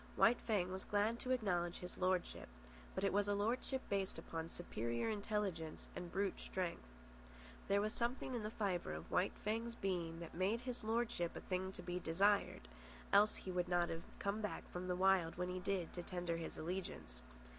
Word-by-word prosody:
White 240 Hz, -, +6 dB
Fang 195 Hz, -5 st, +1 dB
was 190 Hz, 0 st, -3 dB
glad 210 Hz, +3 st, +2 dB
to 255 Hz, -, -5 dB
acknowledge 180 Hz, -9 st, +1 dB
his 180 Hz, 0 st, -7 dB
lordship, 185 Hz, -, +1 dB, 0.5 s
but 190 Hz, -, -1 dB
it 195 Hz, -, +3 dB
was 205 Hz, 0 st, +3 dB
a 205 Hz, -, +2 dB
lordship 245 Hz, +5 st, 0 dB
based 195 Hz, -1 st, 0 dB
upon 165 Hz, 0 st, -4 dB
superior 120 Hz, -, -1 dB
intelligence 200 Hz, -6 st, -2 dB
and 175 Hz, -1 st, -5 dB
brute 195 Hz, +1 st, 0 dB
strength. 180 Hz, -, -2 dB, 0.8 s
There 200 Hz, 0 st, +4 dB
was 215 Hz, +2 st, 0 dB
something 245 Hz, +2 st, -1 dB
in 240 Hz, -, -1 dB
the 210 Hz, -, -2 dB
fibre 195 Hz, -, -1 dB
of 80 Hz, +2 st, -7 dB
White 180 Hz, +2 st, +2 dB
Fang's 230 Hz, +2 st, 0 dB
being 170 Hz, -5 st, -1 dB
that 170 Hz, -1 st, -7 dB
made 195 Hz, +7 st, +1 dB
his 250 Hz, -2 st, -3 dB
lordship 225 Hz, -6 st, 0 dB
a -, -, -5 dB
thing 190 Hz, 0 st, -1 dB
to 180 Hz, -, -7 dB
be 175 Hz, 0 st, -2 dB
desired, 195 Hz, -, +3 dB, 0.5 s
else 210 Hz, +2 st, +7 dB
he 185 Hz, -, -5 dB
would 180 Hz, 0 st, 0 dB
not 175 Hz, -1 st, +3 dB
have 165 Hz, 0 st, -2 dB, 0.2 s
come 200 Hz, +2 st, -1 dB
back 210 Hz, -, -3 dB
from 180 Hz, +1 st, -3 dB
the 180 Hz, -, +1 dB
Wild 185 Hz, -3 st, +4 dB
when 180 Hz, 0 st, 0 dB
he 185 Hz, 0 st, -2 dB
did 185 Hz, -2 st, -1 dB
to 175 Hz, -, -3 dB
tender 175 Hz, -1 st, -2 dB
his 165 Hz, -, -5 dB
allegiance. 160 Hz, -, -4 dB
190 Hz, 190 wpm, -40 LUFS, 175-210 Hz, 0.8 s, else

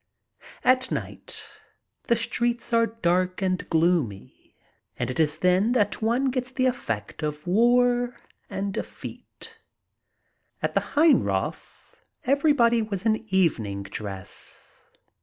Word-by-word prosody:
At 255 Hz, 0 st, +4 dB
night -, -, -5 dB, 0.6 s
the 235 Hz, -, +3 dB
streets 235 Hz, +1 st, -1 dB
are 230 Hz, 0 st, +4 dB
dark 185 Hz, -4 st, 0 dB
and 185 Hz, -1 st, -1 dB
gloomy, 160 Hz, -, 0 dB, 0.4 s
and -, -, -2 dB
it 130 Hz, -, -5 dB
is 155 Hz, -1 st, +2 dB
then 185 Hz, +7 st, +3 dB
that 205 Hz, -5 st, +1 dB
one 245 Hz, +4 st, +1 dB
gets 255 Hz, 0 st, -2 dB
the 260 Hz, 0 st, 0 dB
effect 115 Hz, -, -2 dB
of 150 Hz, -1 st, -4 dB
war 245 Hz, +5 st, +3 dB, 0.3 s
and 195 Hz, 0 st, -3 dB
defeat. -, -, -8 dB, 1.0 s
At -, -, 0 dB
the -, -, +3 dB, 0.2 s
Heinroth 240 Hz, -, +1 dB, 0.3 s
everybody 270 Hz, -4 st, +3 dB
was 210 Hz, -2 st, -4 dB
in 220 Hz, 0 st, +1 dB
evening 110 Hz, -, +1 dB
dress. 100 Hz, -1 st, -7 dB
210 Hz, 115 wpm, -25 LUFS, 160-245 Hz, 1.0 s, At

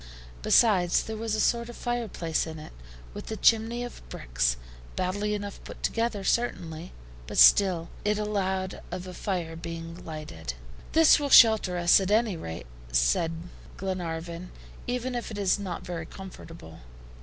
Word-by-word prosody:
Besides, 185 Hz, -, +4 dB
there 220 Hz, -, -5 dB
was 220 Hz, 0 st, -2 dB
a -, -, -2 dB
sort 235 Hz, +1 st, +1 dB
of 240 Hz, -, -9 dB
fireplace 220 Hz, -10 st, -2 dB
in 160 Hz, 0 st, -7 dB
it, 155 Hz, -, -10 dB, 0.4 s
with -, -, -8 dB
a 220 Hz, -, -4 dB
chimney 230 Hz, +2 st, +3 dB
of 245 Hz, -, -8 dB
bricks, -, -, -1 dB, 0.4 s
badly 205 Hz, +3 st, -1 dB
enough 205 Hz, -1 st, -6 dB
put -, -, -11 dB
together, 230 Hz, -3 st, -1 dB
certainly, 175 Hz, -8 st, -1 dB, 0.4 s
but -, -, -6 dB
still 180 Hz, -4 st, +6 dB, 0.2 s
it 210 Hz, 0 st, +1 dB
allowed 190 Hz, -3 st, -2 dB
of 180 Hz, +1 st, -5 dB
a 185 Hz, -, -8 dB
fire 175 Hz, -4 st, -3 dB
being 165 Hz, +1 st, -7 dB
lighted. 85 Hz, -, -7 dB, 0.4 s
"This 320 Hz, -1 st, +6 dB
will 285 Hz, -1 st, -2 dB
shelter 220 Hz, -8 st, +7 dB
us, 175 Hz, +2 st, +5 dB
at 190 Hz, -1 st, -2 dB
any 215 Hz, -2 st, +2 dB
rate," 80 Hz, -, -7 dB, 0.3 s
said -, -, +2 dB, 0.5 s
Glenarvan, 175 Hz, -2 st, -4 dB, 0.4 s
"even 250 Hz, +1 st, -2 dB
if 240 Hz, -1 st, -4 dB
it 215 Hz, -, -7 dB
is 200 Hz, -1 st, +1 dB
not 190 Hz, -4 st, -5 dB
very 165 Hz, -2 st, -5 dB
comfortable. 165 Hz, -, -11 dB
185 Hz, 155 wpm, -27 LUFS, 165-220 Hz, 0.5 s, shelter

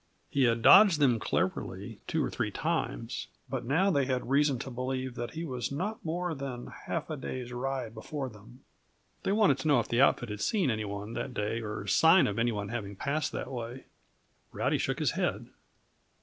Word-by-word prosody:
He 135 Hz, -2 st, +3 dB
had 115 Hz, -1 st, +1 dB
dodged 200 Hz, -5 st, +8 dB
them 130 Hz, -6 st, +3 dB
cleverly 110 Hz, -, -2 dB
two -, -, 0 dB
or -, -, -4 dB
three -, -, -1 dB
times, -, -, -2 dB, 0.2 s
but -, -, -4 dB
now 170 Hz, +10 st, +3 dB
they 140 Hz, -5 st, +2 dB
had 125 Hz, -1 st, -2 dB
reason 140 Hz, -1 st, +3 dB
to 130 Hz, +2 st, -6 dB
believe 130 Hz, +1 st, -3 dB
that 120 Hz, +4 st, -5 dB
he 165 Hz, +1 st, -3 dB
was 125 Hz, -4 st, -3 dB
not 195 Hz, +10 st, -3 dB
more 175 Hz, +1 st, -2 dB
than 135 Hz, -4 st, -6 dB
half 165 Hz, -1 st, -3 dB
a -, -, -1 dB
day's 125 Hz, -3 st, -5 dB
ride 125 Hz, -2 st, -3 dB
before 135 Hz, +5 st, -5 dB
them. 120 Hz, +3 st, -14 dB, 0.6 s
They -, -, -1 dB
wanted 200 Hz, -, +4 dB
to 135 Hz, -, -2 dB
know 145 Hz, -, +5 dB
if -, -, -2 dB
the 120 Hz, +2 st, +3 dB
outfit 120 Hz, -3 st, +3 dB
had 105 Hz, 0 st, -5 dB
seen 190 Hz, -, +2 dB
any 110 Hz, -1 st, -2 dB
one 100 Hz, +2 st, -5 dB
that 130 Hz, 0 st, -4 dB
day, 105 Hz, +3 st, -1 dB
or 105 Hz, -2 st, -5 dB
sign 165 Hz, -, +6 dB
of 100 Hz, +1 st, -1 dB
any 120 Hz, +1 st, +2 dB
one 100 Hz, -2 st, -4 dB
having 105 Hz, -3 st, -4 dB
passed 145 Hz, +8 st, -1 dB
that -, -, -4 dB
way. 120 Hz, +1 st, -6 dB, 0.7 s
Rowdy -, -, 0 dB
shook -, -, -1 dB
his -, -, +1 dB
head. -, -, -2 dB
130 Hz, 200 wpm, -30 LUFS, 115-145 Hz, 0.7 s, dodged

